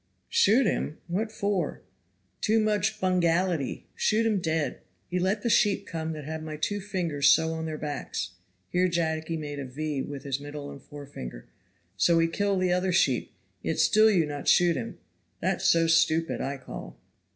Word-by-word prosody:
"Shoot 235 +6 +4
him! 155 -6 -1
what 210 +6 -2
for?" 200 -7 -2 0.6
"Too 220 +1 +3
much 215 0 +1
bungality,* 175 -4 +1
shoot 220 +1 +1
him 215 -3 +2
dead. 160 -5 -1 0.3
He 180 - -1
let 195 +4 0
the - - 0
sheep 205 -1 +3
come 160 -1 -4
that 155 -1 -7
have 160 +1 -5
my 155 -1 -6
two 205 +7 -1
fingers 170 -8 +1
so 160 0 +4
on 160 0 -4
their 155 -1 -4
backs;" 145 -11 -4 0.4
here 180 +1 +3
Jacky 165 -1 -1
made 145 -2 -5
a 140 - -4
V 145 +2 -3
with 140 -1 -6
his 140 -2 -2
middle 145 0 -7
and 140 - -10
forefinger, 140 - -9 0.5
"so 165 - +4
he 165 0 +4
kill 200 +3 0
the 185 -1 +2
other 180 +1 +1
sheep 135 -8 +2 0.3
yet - - -2
still 215 +1 +5
you 180 -7 +3
not 145 -1 -6
shoot 175 -1 +5
him 115 -3 -5 0.4
that - - 0
so 165 0 +4
stupid 165 0 +2
I 140 +1 -3
call." - - -9
165 Hz, 175 wpm, -27 LUFS, 145-185 Hz, 0.6 s, still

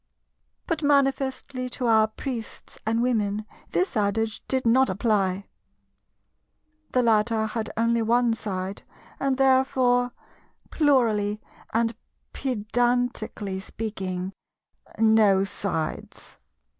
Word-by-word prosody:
But 330 -2 -2
manifestly 270 -2 +1
to 255 - -2
our 220 -2 +5
Priests 230 +1 -7
and 225 +1 +2
Women 215 -4 0 0.2
this 365 -5 0
adage 220 +1 0
did 260 -1 0
not 260 +3 +4
apply. 200 -4 0 1.5
The 250 - +3
latter 220 -1 +2
had 220 0 -3
only 230 0 +2
one 235 +1 +3
side, 195 -3 -4 0.4
and 270 -1 0
therefore—plurally 250 -3 +1 0.3
and 230 0 +1 0.4
pedantically 240 -4 -1
speaking—no 195 +1 -1
sides. 190 -5 -4
225 Hz, 85 wpm, -25 LUFS, 210-255 Hz, 1.5 s, our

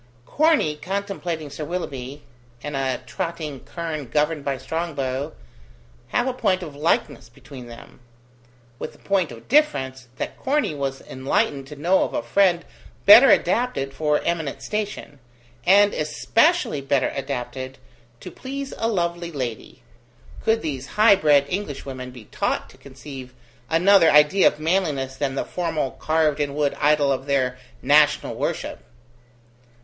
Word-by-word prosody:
Corney 300 - +2
contemplating 180 -3 -4
Sir 150 - -6
Willoughby, 145 -5 -5 0.4
and 145 -1 -4
a 130 -2 -1
trotting 155 +2 -4
kern 160 -4 -5
governed 150 +4 0
by 140 -1 -2
Strongbow, 145 -3 -3 0.7
have 245 - 0
a 260 - 0
point 185 -7 0
of 150 -4 -8
likeness 145 -4 -1
between 125 +1 -12
them; 115 0 -13 0.8
with - - -6
the - - -19
point 190 -6 0
of 115 -1 -12
difference, 130 - +1
that - - -5
Corney 285 - 0
was 135 -2 -3
enlightened 135 +1 -1
to 150 - -9
know 175 +6 +2
of - - -4
a - - -1
friend 175 +7 +2 0.4
better 240 +6 +10
adapted 180 - +2
for 150 +1 +1
eminent 160 -5 -2
station, 205 -9 -4 0.5
and 205 +2 +6
especially 225 - +1
better 135 -1 0
adapted 130 -1 -5 0.4
to - - -8
please 275 +1 -6
a 225 - +1
lovely 175 -4 -1
lady 120 - -6 0.6
could 225 0 +2
these 135 -4 -4
high 215 -1 +7
bred 145 -6 +4
Englishwomen 140 -9 -5
but - - -13
be 115 -4 -11
taught - - -2
to - - -19
conceive 130 -1 -10 0.3
another 175 +1 +5
idea 150 +6 +6
of 150 - 0
manliness 155 -6 0
than 135 -1 -2
the - - -2
formal 165 -6 -2
carved 155 -2 0
in 145 -1 -1
wood 145 -1 0
idol 145 -1 +3
of 135 +1 -2
their 130 -2 0 0.2
national 150 +2 +4
worship! - - -3
150 Hz, 145 wpm, -23 LUFS, 135-180 Hz, 0.8 s, better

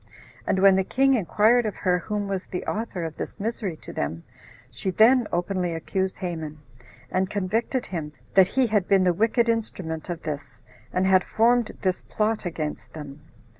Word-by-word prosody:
And - - +2
when 190 0 +6
the 190 - +2
king 270 +7 +3
inquired 220 +2 +3
of 210 - -4
her 180 -2 +1
whom 205 +2 -3
was 195 -1 -3
the 180 - -5
author 210 -5 -3
of 160 -2 -5
this - - -6
misery 205 -5 -3
to - - -8
them, 80 +3 -3 0.5
she 120 - -3
then 225 +5 +5
openly 175 -1 -1
accused 190 +3 -2
Haman, 160 -5 -5 0.5
and 185 0 +1
convicted 220 +6 -1
him, 160 -5 -5 0.2
that 190 -2 +7
he 260 +4 +2
had 210 -5 +1
been 195 -1 +4
the 180 -1 +3
wicked 230 +5 +2
instrument 185 -8 -2
of 170 -1 -4
this, 145 -2 -6 0.3
and 185 +1 +1
had 190 -1 +5
formed 235 +1 +2
this 185 -1 0
plot 215 -2 -1
against 155 -3 -5
them. 150 -2 -9
190 Hz, 175 wpm, -25 LUFS, 170-220 Hz, 0.5 s, that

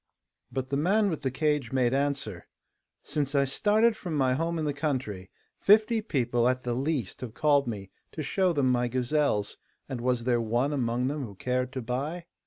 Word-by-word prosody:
But 130 -1 -3
the 140 - 0
man 200 +6 +2
with 160 - -3
the 135 - 0
cage 145 -2 0
made 125 -2 +2
answer: 135 -9 -2 0.6
'Since 145 -1 -2
I 140 0 +4
started 215 - +3
from 175 -7 -5
my 130 -3 +2
home 165 +5 -1
in 155 - -1
the 145 - 0
country, 130 -11 -3 0.3
fifty 215 +2 +4
people 120 - +1
at 130 0 -1
the 120 - -1
least 130 -4 -2
have 120 -3 -7
called 145 -3 +3
me 100 -4 -5 0.2
to 155 - -4
show 185 +5 +1
them 140 -5 +2
my 125 0 +2
gazelles, 125 -3 0 0.3
and 125 -3 -5
was 125 -1 0
there 120 -1 +2
one 120 +6 0
among 125 -2 0
them 145 +2 -2
who 105 -5 -8
cared 125 +4 -1
to 130 -3 -4
buy? 145 +9 -3
135 Hz, 195 wpm, -28 LUFS, 120-150 Hz, 0.6 s, I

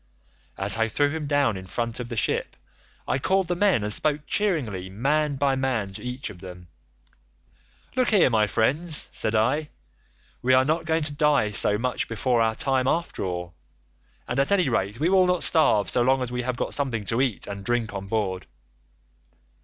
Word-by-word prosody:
As 95 +2 +1
I 115 0 +2
threw 145 +5 +1
him 155 -1 -4
down 140 -6 +2
in 95 0 -8
front 115 +4 -3
of 120 -1 -6
the 120 - -5
ship, - - -1 0.5
I 130 - 0
called 190 +5 +1
the 175 - -1
men 185 - +2
and 105 0 +1
spoke 150 +3 +1
cheeringly 125 - -1
man 145 +8 0
by 135 0 +1
man 125 -7 -2
to - - -9
each 125 +2 -5
of 90 - -14
them. 90 -2 -11 1.3
'Look 255 -1 +2
here 200 - +4
my 110 -2 +3
friends,' 150 - 0
said 110 - -1
I, 145 +8 +1 0.7
'we 130 +1 +3
are 130 0 +4
not 160 +3 0
going 160 -1 0
to 145 -1 0
die 145 -7 +2
so 105 0 +3
much 125 +3 -2
before 115 +2 0
our 110 0 +1
time 130 0 +1
after 170 +5 -1
all, 90 -1 -4 0.7
and 125 - -2
at 140 +5 +1
any 185 -8 +3
rate 105 -1 -1
we 160 - +1
will 185 -1 +4
not 180 -1 +1
starve 130 - +3
so 125 - +2
long 130 +1 +2
as 125 - -5
we 125 0 -2
have 125 0 -3
got - - -2
something 120 -7 -2
to 115 +5 +1
eat 125 -7 0
and 100 -1 -7
drink 120 -1 -1
on 100 -1 -6
board. 100 -3 -2
125 Hz, 195 wpm, -25 LUFS, 105-150 Hz, 1.3 s, here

